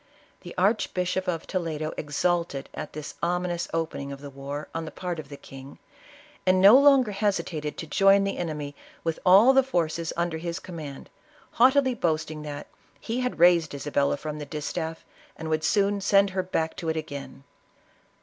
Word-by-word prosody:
The 175 - -10
Archbishop 185 -2 0
of 165 -3 -2
Toledo 160 -4 -3
ex 145 -1 -4
ulted 170 -6 0
at - - -7
this 150 -1 -7
ominous 175 0 -1
opening 160 -4 -3
of 140 - -7
the 140 0 -9
war 140 +2 -6
on 165 0 -3
the - - -6
part 175 -3 -4
of 145 -3 -9
the 140 - -8
king, 135 0 -12 0.7
and 185 0 +3
no 200 +5 +9
longer 275 -4 +6
hesitated 190 -7 -2
to - - -5
join 195 +4 +4
the 195 - -2
enemy 150 -4 -4 0.3
with 165 -1 -2
all 200 +8 +7
the 270 - +6
forces 170 -9 -1
under 170 -1 -1
his 170 +1 -4
command, 155 -6 -8 0.4
haughtily 260 +2 +4
boast 160 -8 -1
ing 155 -1 -7
that 145 -1 -6 0.2
" - - -33
he 230 +3 -3
had 250 0 -2
raised 170 -3 +4
Isabella 140 0 0
from 150 +1 -6
the 150 - -5
distaff, 160 +2 -4 0.3
and 160 -1 -5
would 155 0 0
soon 200 +4 +2
send 195 0 +4
4ier 185 -1 -2
back 160 -3 -1
to 165 - -3
it 160 - -1
again." 140 -3 -7
170 Hz, 180 wpm, -26 LUFS, 150-190 Hz, 0.7 s, no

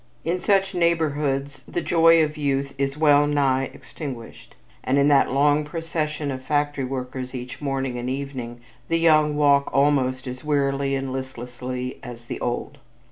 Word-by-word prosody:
In 175 +3 0
such 195 +1 +2
neighborhoods 145 -5 0
the - - -2
joy 165 -1 +5
of 150 0 -2
youth 140 -2 -1
is 135 +1 -1
well 145 -1 +5
nigh 135 -2 +2
extinguished; 130 -7 -9 0.3
and 130 - +1
in 140 +1 +4
that 140 -1 +4
long 145 +2 +3
procession 150 -2 -3
of 130 -1 -5
factory 145 -1 0
workers, 130 0 -5
each 125 +3 -7
morning 135 -3 -2
and 120 +1 -3
evening, 130 -3 -5 0.3
the 165 - +1
young 155 -2 +4
walk 140 -1 +4
almost 135 -2 +2
as 130 +1 -7
wearily 140 -2 0
and 135 -1 -3
listlessly 125 -1 -5
as 120 -1 -10
the - - -5
old. 130 +4 -3
140 Hz, 155 wpm, -23 LUFS, 130-150 Hz, 0.3 s, joy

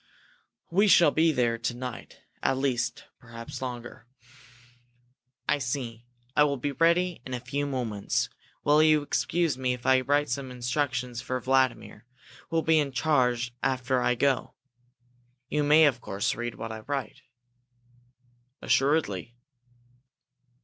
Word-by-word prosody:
We 200 +5 +4
shall 170 -5 +6
be 160 +2 +3
there 120 -4 0
to 120 +1 -2
night, 125 -1 -8 0.2
at 135 - +1
least, 125 -3 -1
perhaps 115 +3 -9
longer." 120 -2 -7 1.4
"I - - +2
see. 120 -2 -4 0.3
I 150 - +6
will 140 -1 +1
be 145 +3 -2
ready 170 +2 +2
in 130 0 -5
a - - -4
few 140 +4 -3
moments. 120 -7 -1 0.4
Will 150 +1 +5
you 155 -1 +4
excuse 165 0 0
me 130 -1 0
if 120 - -15
I 130 0 +5
write 145 +2 +1
some 130 +2 -3
instructions 125 -1 -2
for 130 0 -3
Vladimir, 130 -3 0 0.4
who 165 - -4
will 165 - +2
be 160 -1 +4
in 145 -2 -1
charge 125 -5 +1
after 130 -1 0
I 125 - +2
go? 135 +2 0 0.9
You 150 0 0
may, 150 +2 +6
of 130 -4 +1
course, 100 -2 -1
read 120 -1 -5
what 115 0 -6
I 110 - -6
write." 135 0 -5 1.4
"Assuredly." 130 - +1
130 Hz, 140 wpm, -27 LUFS, 120-145 Hz, 1.4 s, shall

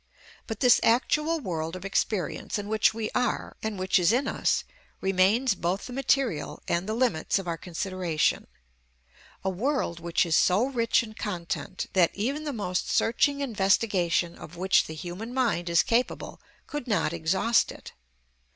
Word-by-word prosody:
But 225 -3 -5
this 250 -2 +6
actual 300 +7 +2
world 165 - -4
of 185 +1 -8
experience, 195 +1 -1
in 205 0 -5
which 215 0 +3
we 220 -1 -4
are, 250 0 -1
and 220 -2 -3
which 185 0 +2
is 175 +2 +4
in 255 +4 +1
us, - - 0 0.4
remains 195 +6 +3
both 180 +1 -2
the 250 - -8
material 260 - 0
and 175 +4 -1
the 220 - -1
limits 230 -11 +1
of 195 -2 -5
our 170 - -1
consideration: 175 -1 -1 1.0
a 190 - 0
world 220 - -1
which 170 +1 +1
is 165 -2 +1
so 190 +7 +4
rich 235 -4 +1
in 215 -1 -9
content 185 -3 -4
that 180 -3 +3
even 275 +9 -2
the 295 - -2
most 195 -7 -2
searching 280 +5 +2
investigation 195 -7 +1
of 170 +3 -11
which 190 +2 +3
the 160 - -7
human 185 +9 -7
mind 220 -9 0
is 170 -1 +4
capable 240 +2 -1 0.2
could 295 -4 -6
not 205 -7 +1
exhaust 190 +8 +2
it. - - -12
200 Hz, 160 wpm, -27 LUFS, 175-240 Hz, 1.0 s, this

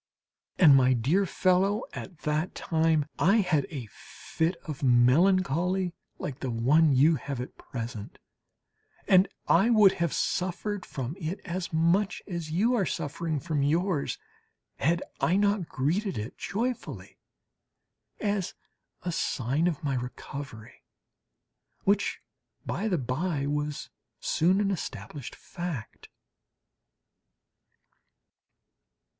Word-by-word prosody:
And, 150 -7 +8
my 130 -1 +5
dear 150 - +2
fellow, 190 +5 +2
at 180 -5 -8
that 155 +4 -1
time 160 -3 +1
I 195 +5 +4
had 160 -7 +1
a 135 -7 -5
fit 165 +3 -3
of 150 -4 -6
melancholy 170 +7 +3 0.2
like 140 -1 -5
the 130 - -3
one 135 +6 +4
you 150 +5 +5
have 140 -3 -5
at 125 - -6
present, 115 -4 -7 0.9
and 190 0 +6 0.2
I 195 +7 +4
would 210 -4 +7
have 170 -5 -1
suffered 185 +2 -2
from 135 +2 -4
it 170 +3 -3
as 180 -1 -4
much 170 +5 +1
as 170 -5 -5
you 205 +10 +2
are 215 -6 +2
suffering 155 +3 -2
from 145 +2 -1
yours, 160 +2 0 0.6
had 170 +1 +1 0.2
I 175 - +2
not 200 -3 +1
greeted 170 - -1
it 105 +4 -5
joyfully 240 +4 -4 1.0
as 205 -3 -1 0.5
a 180 - -2
sign 140 +1 0
of 160 -4 -2
my 140 -2 0
recovery, 125 -2 -7 1.0
which, 200 +1 +1 0.5
by 215 - -2
the 185 -5 +1
by, 140 +3 -1
was 150 0 -3 0.3
soon 185 +5 +2
an 200 -1 +1
established 150 -6 -6
fact. 170 - -7
165 Hz, 115 wpm, -28 LUFS, 140-185 Hz, 1.0 s, And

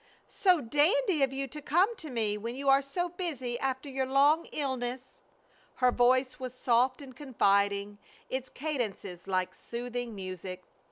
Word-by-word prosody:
"So 365 -5 +3
dandy 315 - +2
of 270 -1 +3
you 270 0 -2
to 300 +4 -8
come 360 - +2
to 310 - -7
me 220 -5 0
when 230 +3 -5
you 275 +1 -1
are 270 0 +6
so 350 +6 -2
busy 285 -9 -4
after 265 +1 -2
your 265 -1 -2
long 285 +5 +4
illness." 260 -3 -4 0.6
Her 250 -1 +3
voice 255 +2 +2
was 255 -1 -6
soft 255 +2 +2
and 260 -2 -12
confiding, 200 -6 +1 0.3
its 260 0 -4
cadences 220 - -4
like 185 -1 0
soothing 245 -1 -5
music. 185 -1 -6
260 Hz, 155 wpm, -30 LUFS, 235-285 Hz, 0.6 s, are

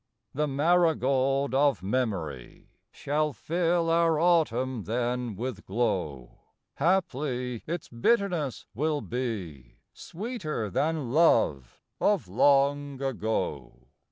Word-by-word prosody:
The 150 +2 0
marigold 140 -3 +2
of 140 -6 +2
memory 95 - -3 0.2
Shall 150 +1 -1
fill 170 +6 0
our 165 -2 +3
autumn 130 - +1
then 120 0 -2
with 115 -1 -5
glow; 90 - -2 0.4
Haply 135 - 0
its 170 0 -4
bitterness 165 - 0
will 150 +5 -1
be 95 - -5 0.2
Sweeter 170 - -5
than 150 - -1
love 75 - +2 0.2
of - - +1
long 140 +5 +2
ago. 110 - -3
135 Hz, 95 wpm, -28 LUFS, 115-155 Hz, 0.4 s, our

